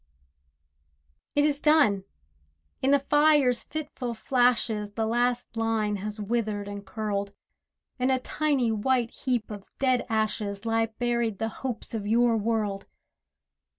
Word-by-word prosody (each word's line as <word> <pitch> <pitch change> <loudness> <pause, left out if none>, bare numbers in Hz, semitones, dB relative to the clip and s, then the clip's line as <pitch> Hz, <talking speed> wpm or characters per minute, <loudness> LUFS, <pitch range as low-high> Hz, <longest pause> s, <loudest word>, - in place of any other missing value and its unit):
It 290 0 +4
is 295 -1 0
done! 285 -11 +4 0.8
in 265 - +2
the 285 - +6
fire's 290 -3 +3
fitful 285 -6 -5
flashes, 235 -4 +1
The 225 +1 -1
last 240 +1 0
line 225 -2 0
has 210 +2 -6
withered 210 -1 -2
and 205 0 -6
curled. 200 0 -3 0.7
In 250 +1 +2
a 260 - +3
tiny 270 -2 0
white 235 +2 +1
heap 245 -4 -2
of 205 -2 -7
dead 255 -2 +1
ashes 215 -2 -1
Lie 225 0 +2
buried 235 -1 -1
the 225 - -2
hopes 240 -1 -5
of 210 -3 -3
your 235 +1 +3
world. 215 -2 -1
230 Hz, 130 wpm, -27 LUFS, 210-255 Hz, 0.8 s, the